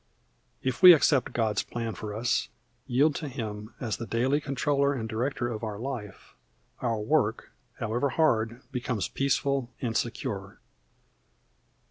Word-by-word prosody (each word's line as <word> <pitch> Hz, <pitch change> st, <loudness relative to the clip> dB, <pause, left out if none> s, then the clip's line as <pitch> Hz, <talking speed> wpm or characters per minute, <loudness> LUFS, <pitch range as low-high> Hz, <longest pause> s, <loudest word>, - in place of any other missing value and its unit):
If 130 Hz, +4 st, -2 dB
we 180 Hz, -1 st, +12 dB
accept 145 Hz, -4 st, +3 dB
God's 110 Hz, -3 st, +1 dB
plan 115 Hz, -2 st, -4 dB
for 105 Hz, -1 st, -6 dB
us, 120 Hz, +2 st, 0 dB, 0.4 s
yield 140 Hz, +4 st, +3 dB
to 155 Hz, -, -4 dB
Him 110 Hz, -4 st, -6 dB
as 115 Hz, -4 st, -2 dB
the 115 Hz, -, -6 dB
daily 130 Hz, +6 st, +1 dB
controller 140 Hz, 0 st, +1 dB
and 115 Hz, -4 st, -3 dB
director 120 Hz, +2 st, -1 dB
of 115 Hz, -2 st, -5 dB
our 105 Hz, -2 st, -3 dB
life, 115 Hz, -5 st, -6 dB, 0.5 s
our 115 Hz, -3 st, 0 dB
work, 110 Hz, -1 st, 0 dB, 0.3 s
however 120 Hz, +4 st, 0 dB
hard, 120 Hz, -4 st, +1 dB
becomes 125 Hz, -4 st, -2 dB
peaceful 140 Hz, -2 st, 0 dB
and 120 Hz, -4 st, -2 dB
secure. 105 Hz, -5 st, -3 dB
120 Hz, 135 wpm, -28 LUFS, 110-135 Hz, 0.5 s, we